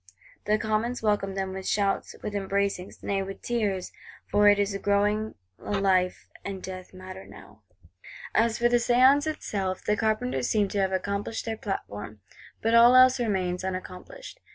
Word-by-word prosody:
The 210 +1 +2
Commons 220 +3 -1
welcomed 200 -2 0
them 190 -1 -2
with 190 0 -6
shouts, 200 -1 0
with 210 - -4
embracings, 200 -1 -2
nay 195 -1 -1
with 195 0 -7
tears; 205 -6 -1 0.4
for 205 0 +6
it 205 - +5
is 200 0 0
growing 205 +2 0 0.2
a - - -5
life 185 -2 +1 0.2
and 195 -1 -5
death 185 -1 -8
matter 185 0 -10
now. 105 +1 -15 0.7
As 225 0 +2
for 240 - +3
the 240 0 +3
Séance 255 +5 +4
itself, 195 -11 -3
the 210 - +2
Carpenters 135 - -1
seem 210 -2 +2
to 205 - -2
have 190 -1 +1
accomplished 200 +3 -3
their 225 -1 -2
platform; 110 - -6 0.4
but 225 +1 +2
all 235 +2 +7
else 255 0 +7
remains 185 -6 -1
unaccomplished. 190 - -7
200 Hz, 160 wpm, -27 LUFS, 190-220 Hz, 0.7 s, all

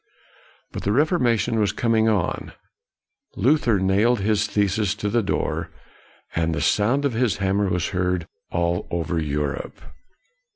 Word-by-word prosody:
But - - -5
the 100 - 0
Reformation 120 - +2
was 105 -2 +2
coming 110 +1 +2
on. 100 -6 -1 0.8
Luther 120 -2 +3
nailed 100 +6 +2
his 105 +1 +1
theses 105 -1 0
to 105 0 -3
the 120 +1 +2
door, 100 - -2 0.7
and 80 0 0
the - - -2
sound 115 - +2
of 140 - 0
his 115 -1 +1
hammer 95 +1 +1
was 90 -1 -1
heard 90 -2 -1 0.2
all 85 0 -1
over 85 0 -1
Europe. 75 -1 -3
105 Hz, 135 wpm, -23 LUFS, 90-115 Hz, 0.8 s, Luther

